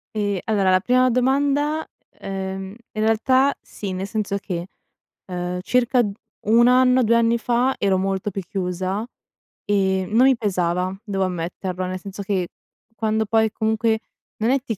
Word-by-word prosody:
Ehm, 205 -2 0
allora 200 -4 +2
la 185 - +5
prima 255 +5 +3
domanda 285 +5 +1 0.4
uhm, 190 0 -4 0.2
in 215 - -3
realtà 255 +5 +3
sì, 200 -2 -7
nel 185 +1 -3
senso 205 -2 -2
che, 180 -3 -5 0.6
uhm, 180 -1 -3
circa 250 +4 +2 0.5
1 235 +2 +6
anno, 255 0 +5
2 235 +1 +3
anni 235 0 +3
fa 245 +3 +1
ero 195 -2 +2
molto 195 +1 -1
più 195 - -4
chiusa 185 +2 -2 0.6
e 190 -2 +1
non 230 +4 +4
mi 265 -2 +4
pesava, 185 -3 -1
devo 195 -3 -1
ammetterlo, 180 +1 -3
nel 185 0 -4
senso 195 +1 -8
che, 190 -3 -1 0.5
quando 220 0 0
poi, 220 0 +2
comunque 220 0 +1 0.4
non 225 +3 +1
è 275 - +3
ti 225 -6 -4
210 Hz, 155 wpm, -22 LUFS, 190-235 Hz, 0.6 s, 1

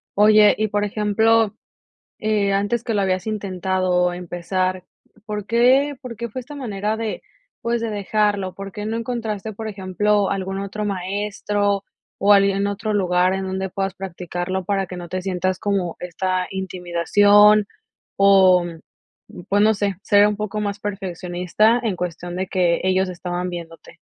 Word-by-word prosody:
Oye, 210 0 +6
y 215 - +1
por 205 0 -1
ejemplo, 215 +1 +2 0.6
eh 210 -2 +1
antes 205 +4 0
que 230 -2 -2
lo 205 - +1
habías 185 0 -1
intentado 185 -3 0
empezar, 180 +1 -2 0.4
¿por 210 -2 -4
qué 255 +6 +3
por 250 -3 -7
qué 235 +1 -4
fue 255 +4 -5
esta 270 +4 -11
manera 215 -5 -3
de, 225 -1 -4 0.4
pues, 235 0 0
de 230 - -2
dejarlo? 205 -2 0
¿Por 195 0 -7
qué 210 +2 -6
no 220 +1 -2
encontraste, 220 -3 -4
por 220 +2 -6
ejemplo, 205 0 0
algún 195 0 -3
otro 200 +2 -4
maestro 200 +1 -1 0.3
o 205 +1 +5
alguien 200 0 +3
otro 205 +1 -2
lugar 180 -2 +2
en 190 0 -2
donde 190 0 -3
puedas 195 +1 -3
practicarlo 180 0 -4
para 195 -1 0
que 180 - -7
no 175 -1 -8
te 185 +1 -3
sientas 185 0 -1
como 195 -4 -1
esta 185 +1 -2
intimidación? 200 +3 +3 0.5
O, 190 -2 +6 0.8
pues 205 +1 +2
no 215 +1 +5
sé, 200 -2 -1
ser 205 0 +5
un 210 - -1
poco 210 0 -4
más 205 -1 -3
perfeccionista 190 +2 0
en 215 -5 -1
cuestión 175 0 -5
de 185 +1 -2
que 175 -2 +1
ellos 185 0 +1
estaban 180 0 -4
viéndote. 170 -2 -9
195 Hz, 155 wpm, -21 LUFS, 185-210 Hz, 0.8 s, Oye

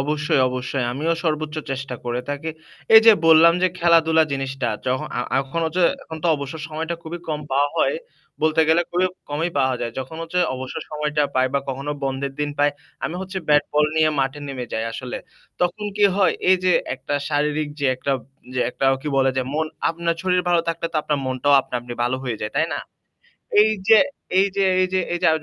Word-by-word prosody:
অবশ্যই, 150 0 +1
অবশ্যই। 125 0 -2
আমিও 155 +5 0
সর্বোচ্চ 155 -1 -1
চেষ্টা 135 -1 -4
করে 120 0 -2
থাকি। 145 +3 -3 0.4
এই 220 - +12
যে 225 - +11
বললাম 165 +1 +8
যে - - +6
খেলাধুলা 165 -2 +4
জিনিসটা 135 -2 -2 0.2
যখন 130 +1 0
আ - - +1
আ - - +3
এখন 135 +5 -4
হচ্ছে 175 +3 0 0.2
এখন 160 - -8
তো - - +3
অবসর 140 +2 -6
সময়টা 160 +2 -3
খুবই 170 +2 -6
কম 150 -1 -2
পাওয়া 140 +2 +3
হয়। - - +2 0.5
বলতে 155 +1 +3
গেলে 165 +2 +4
খুবই 180 +1 +2 0.2
কমই 160 +4 -1
পাওয়া 130 -1 +2
যায়। 115 -1 -3
যখন 130 +5 -6
হচ্ছে 165 +2 -2 0.2
অবসর 130 0 -5
সময়টা 150 0 -1
পাই 130 0 +3
বা 140 - +2
কখনো 135 +2 -3
বন্ধের 135 0 -2
দিন 145 0 0
পাই 145 0 +4 0.3
আমি 165 - -3
হচ্ছে 190 0 -4
ব্যাট 145 -1 +5
বল 150 0 +4
নিয়ে 155 0 +4
মাঠে 135 +2 -1
নেমে 130 -2 -4
যাই 110 - -1
আসলে। 125 +1 -5 0.4
তখন 180 +4 0
কি 210 - +4
হয় 200 -2 +4 0.2
এই 185 - +7
যে 185 - +4 0.2
একটা 135 +2 -5
শারীরিক 150 0 0
যে 140 - +2
একটা, 140 +2 -1 0.4
যে 130 - 0
একটা 135 - -4 0.2
কি 150 - -3
বলে 135 0 +4
যে 130 - +2
মন 160 +1 0 0.2
আপনার 170 0 -1
শরীর 180 -1 +2
ভালো 175 -1 +4
থাকলে 165 0 -1
তো - - -1
আপনার 150 -1 -1
মনটাও 130 +2 +2
আপনা 130 - -11
আপনি 120 0 -8
ভালো 125 +2 0
হয়ে 120 -3 -2
যায়। 105 - -4
তাই - - +3
না? - - -3 0.8
এই 215 - +4 0.2
যে 220 -1 +8 0.4
এই 195 - +4
যে 200 - +2 0.2
এই 185 - +2
যে - - +3 0.2
এই 175 - -1
যে - - +4
এই - - +1
150 Hz, 210 wpm, -22 LUFS, 135-165 Hz, 0.8 s, এই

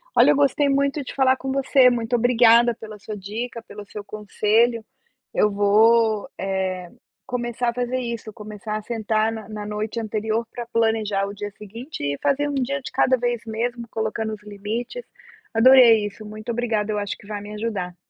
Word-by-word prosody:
Olha, - - +6
eu - - +3
gostei 285 0 +2
muito 280 +1 +1
de - - -8
falar 265 -1 +3
com 265 0 -5
você, 270 -1 +4
muito 240 0 -1
obrigada 240 0 +5
pela 215 -1 -10
sua 210 +1 -7
dica, 230 +5 -5
pelo 210 -2 -10
seu 205 +1 -8
conselho. 215 +2 +1 0.5
Eu 210 - +3
vou, 215 +2 +3
eh, 190 -2 -2 0.4
começar 240 -1 -2
a 235 - -2
fazer 250 +1 -2
isso, 235 -3 -5
começar 210 -1 -6
a 215 - -6
sentar 220 -1 0
na 220 -2 -7
na 210 -1 -6
noite 210 +2 -3
anterior 220 +1 -2
pra 240 -1 -6
planejar 220 -3 +1
o 200 - -6
dia 205 0 -5
seguinte 230 - -9
e 145 0 -1
fazer 285 +1 +1
um - - -3
dia 275 +1 -1
de - - -8
cada 260 -1 +3
vez 240 -1 -1
mesmo, 235 +2 -3
colocando 220 0 -2
os 210 -1 -9
limites. 215 - -5 0.5
Adorei 230 -2 +7
isso, 205 +1 -8
muito 215 +2 -6
obrigada, 225 -3 -1
eu 210 - -1
acho 205 -1 -4
que - - -17
vai 205 0 -5
me 205 +1 -9
ajudar. 210 -5 -4
225 Hz, 185 wpm, -23 LUFS, 210-245 Hz, 0.5 s, Adorei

